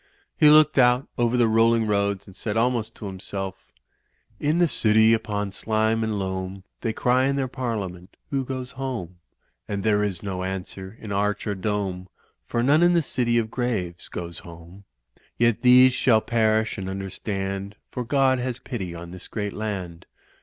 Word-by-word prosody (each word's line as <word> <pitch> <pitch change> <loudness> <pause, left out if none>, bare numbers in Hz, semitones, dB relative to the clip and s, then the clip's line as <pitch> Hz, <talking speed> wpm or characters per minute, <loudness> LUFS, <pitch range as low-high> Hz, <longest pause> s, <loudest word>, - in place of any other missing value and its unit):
He 150 - +6
looked 155 -1 +6
out 125 +1 +4
over 120 +1 +2
the 120 -2 +4
rolling 115 +1 +3
roads 100 -2 0
and 95 - -14
said 105 +1 -3
almost 115 -1 0
to 110 - -9
himself: 95 0 -6 0.7
"In 150 +3 +1
the 175 -1 +4
city 110 -5 +4
set 115 - +5
upon 105 -2 -3
slime 110 +2 0
and 110 -1 -1
loam 95 0 -4 0.2
They 115 - -1
cry 125 +3 +2
in 140 +1 +1
their 135 -1 0
parliament 105 -8 -5
*Who 135 -1 0
goes 130 -1 -5
home?' 115 -10 -5 0.5
And 100 -2 -3
there 105 -1 +2
is 95 -3 -3
no 95 -2 -3
answer 95 +2 -6
in 105 - -8
arch 105 +1 0
or 105 - -1
dome, 95 -2 -3 0.4
For 120 - 0
none 145 +5 +4
in 175 0 +5
the 170 - +3
city 120 -3 0
of 110 -1 0
graves 105 -9 -3
goes 85 -1 -7
home. 85 +3 -13 0.5
Yet 115 -1 +2
these 125 0 +7
shall 125 -3 +4
perish 110 -2 +1
and 95 0 -4
understand, 95 +1 -4 0.2
For 125 - -3
God 130 +1 +2
has 125 -1 -3
pity 95 -10 -6
on 85 0 -8
this 90 0 -10
great 105 -2 -4
land. 95 -6 -5
110 Hz, 175 wpm, -24 LUFS, 95-125 Hz, 0.7 s, these